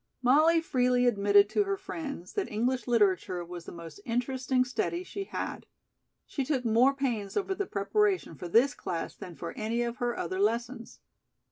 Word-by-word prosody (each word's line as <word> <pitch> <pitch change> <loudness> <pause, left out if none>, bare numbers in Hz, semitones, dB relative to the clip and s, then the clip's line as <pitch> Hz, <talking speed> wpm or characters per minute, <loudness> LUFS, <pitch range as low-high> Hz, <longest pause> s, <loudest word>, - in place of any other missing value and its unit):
Molly 310 +6 +5
freely 250 -4 +2
admitted 205 -3 +5
to 415 - +2
her 395 0 -1
friends 300 - -6
that 405 - -2
English 245 +5 0
Literature 190 -6 +2
was 175 0 -8
the - - -8
most 165 -1 -10
interesting 255 +2 0
study 345 +7 -2
she 395 +1 -6
had. - - -5 0.6
She 275 - -3
took 260 -2 -1
more 240 +5 +4
pains 235 -8 -2
over 395 -1 0
the 390 0 -3
preparation 375 - +1
for 175 +3 -7
this 240 +10 +4
class 170 -2 -4
than 175 - -9
for 170 - -6
any 230 +2 -1
of 235 +1 -3
her 240 -1 -1
other 185 +2 -3
lessons. 230 +3 -1
245 Hz, 170 wpm, -29 LUFS, 200-275 Hz, 0.6 s, Molly